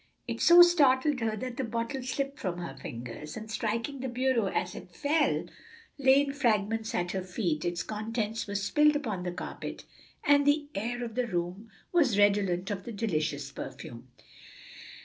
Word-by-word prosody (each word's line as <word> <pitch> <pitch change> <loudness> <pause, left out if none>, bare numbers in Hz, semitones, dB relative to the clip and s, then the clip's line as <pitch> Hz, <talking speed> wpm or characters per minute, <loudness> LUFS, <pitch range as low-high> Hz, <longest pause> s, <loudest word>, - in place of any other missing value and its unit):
It - - -4
so 350 0 +9
startled 290 -5 +4
her 220 -2 -1
that 250 +2 -5
the 265 - -1
bottle 230 +3 -3
slipped 275 +2 -3
from 180 -3 -3
her 175 -1 -6
fingers, 120 - -7
and 220 0 -7
striking 230 +6 -2
the 260 - -3
bureau 245 -3 +1
as 180 -1 -2
it - - -9
fell, 295 +1 +1 0.5
lay 270 0 +6
in 280 -1 -2
fragments 225 -4 0
at 175 0 -1
her 190 - -2
feet; 180 -4 -2
its 175 0 -1
contents 220 0 -3
were 200 - -5
spilled 295 +10 +3
upon 220 -11 -2
the 180 0 -3
carpet, 175 - -7 0.4
and 285 0 +5
the 290 0 +2
air 240 +4 -3
of 230 - -7
the 250 0 -1
room 180 +3 -3 0.2
was 285 - +3
redolent 200 -2 +2
of 195 -2 -4
the 235 - -7
delicious 155 -10 -2
perfume. 130 -2 -8
225 Hz, 170 wpm, -29 LUFS, 185-265 Hz, 0.5 s, so